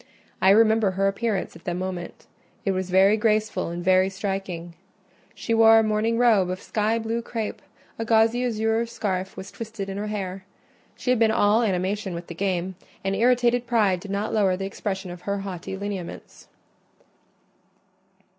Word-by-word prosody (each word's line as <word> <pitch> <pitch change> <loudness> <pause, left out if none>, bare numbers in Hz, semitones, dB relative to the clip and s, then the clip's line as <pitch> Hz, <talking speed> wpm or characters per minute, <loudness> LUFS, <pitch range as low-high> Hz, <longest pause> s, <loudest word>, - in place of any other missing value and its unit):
I 190 - +5
remember 220 0 +5
her 195 +1 0
appearance 200 -1 -2
at 165 - -15
the 175 - -2
moment—it 185 +2 -6
was 185 -1 -2
very 190 +3 +5
graceful 215 -4 0
and 175 +1 -5
very 185 0 +4
striking: 190 -3 -4 0.6
she 230 - -2
wore 225 0 +7
a 225 - +5
morning 215 +2 +1
robe 220 -7 +4
of 185 0 -3
sky 215 +1 0
blue 230 +1 -2
crape; 225 -2 -5 0.4
a - - -1
gauzy 225 +2 +3
azure 225 -1 0
scarf 190 -5 -3
was 190 - -8
twisted 220 -3 -6
in 195 - -5
her 210 - -3
hair. 195 -2 -4 0.5
She 250 - -1
had 250 - +2
been 225 -1 +4
all 220 0 +3
animation 195 -2 -1
with 170 +1 -6
the 170 - -8
game, 185 0 -2 0.3
and 195 0 0
irritated 245 +1 +2
pride 210 -6 +2
did 200 - -10
not 200 +2 -2
lower 195 -4 +2
the 195 - -4
expression 190 -1 -4
of 175 0 -9
her 200 +1 -2
haughty 190 -1 -6
lineaments. 200 -3 -7
200 Hz, 165 wpm, -24 LUFS, 190-225 Hz, 0.6 s, wore